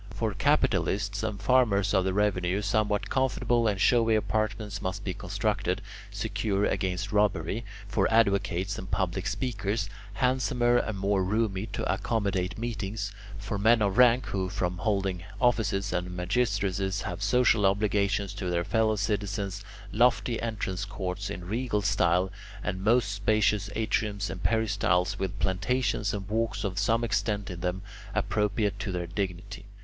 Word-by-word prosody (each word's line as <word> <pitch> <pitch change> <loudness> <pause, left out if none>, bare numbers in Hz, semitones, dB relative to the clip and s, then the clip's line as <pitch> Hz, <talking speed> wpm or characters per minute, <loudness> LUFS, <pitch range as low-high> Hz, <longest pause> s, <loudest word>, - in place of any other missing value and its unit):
For 110 0 -1
capitalists 100 +1 +1
and 110 -2 -3
farmers 105 -4 +3
of 95 -2 +3
the 95 - 0
revenue, 100 -1 +1
somewhat 105 0 0
comfortable 120 -3 +1
and 100 -3 0
showy 115 +2 +4
apartments 105 -1 -1
must 95 +2 -3
be 95 - -2
constructed, 100 +1 -1 0.3
secure 100 -2 -1
against 95 +1 -1
robbery; 105 0 +1 0.2
for 110 +2 +1
advocates 100 -3 +2
and 95 - -8
public 95 -1 -1
speakers, 105 -5 -2 0.2
handsomer 125 +1 +2
and 110 -4 -1
more 95 0 +1
roomy, 105 0 0
to - - -4
accommodate 95 -3 -1
meetings; 105 -3 -3 0.3
for 100 0 -4
men 115 +3 +5
of 100 +2 +1
rank 125 0 +6
who, 95 -2 -2
from 90 -2 -2
holding 95 -3 -1 0.2
offices 105 -5 +1
and 90 0 -1
magistracies, 100 -1 0
have 95 -2 -5
social 110 0 +3
obligations 100 -1 +1
to 100 -3 -4
their 85 0 0
fellow 110 +3 +2
citizens, 100 -1 -2 0.3
lofty 120 +1 +2
entrance 105 -4 -3
courts 100 -1 -4
in 90 -3 -6
regal 105 +1 -1
style, 95 -1 +2 0.3
and 95 0 -3
most 115 0 +3
spacious 100 0 +1
atriums 105 -2 -1
and 95 - -7
peristyles, 100 -5 +1
with 95 +1 -3
plantations 105 +3 0
and 100 -2 -4
walks 110 -1 -1
of 95 -2 -2
some 115 +1 +2
extent 105 -3 -1
in 90 - -6
them, 90 +2 -2 0.3
appropriate 105 0 0
to 105 - -3
their 90 -1 -2
dignity. 95 +2 -4
100 Hz, 145 wpm, -28 LUFS, 95-110 Hz, 0.3 s, rank